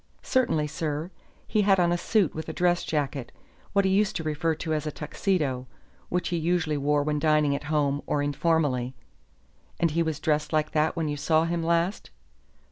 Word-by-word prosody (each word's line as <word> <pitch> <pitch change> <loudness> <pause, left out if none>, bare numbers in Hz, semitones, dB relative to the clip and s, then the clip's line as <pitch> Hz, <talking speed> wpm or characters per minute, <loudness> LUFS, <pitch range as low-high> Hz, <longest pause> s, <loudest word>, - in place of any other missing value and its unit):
"Certainly, 240 - +1
sir. 155 +2 -3 0.4
He 215 - +2
had 195 -2 +4
on 175 -1 +3
a - - +3
suit 205 -6 +2
with 160 - -6
a - - -4
dress 175 -1 +2
jacket, 145 -4 -2 0.4
what 200 -1 +3
he 190 - +2
used 200 +1 +2
to 165 - -2
refer 155 +1 0
to 160 0 -3
as 155 0 -1
a - - -2
Tuxedo, 150 -5 -1 0.4
which 180 0 -1
he 175 - 0
usually 165 -2 0
wore 145 +1 +1
when 150 0 0
dining 150 -2 +3
at 140 - -5
home 145 -2 +1
or 145 - 0
informally." 145 -4 0 0.8
"And 170 -2 +2
he 170 +2 +1
was 160 -2 -1
dressed 150 -2 0
like 155 -1 +1
that 155 0 +1
when 165 -2 -1
you 145 0 -2
saw 155 +2 +2
him 170 0 -1
last?" 170 +3 0
155 Hz, 195 wpm, -26 LUFS, 150-170 Hz, 0.8 s, had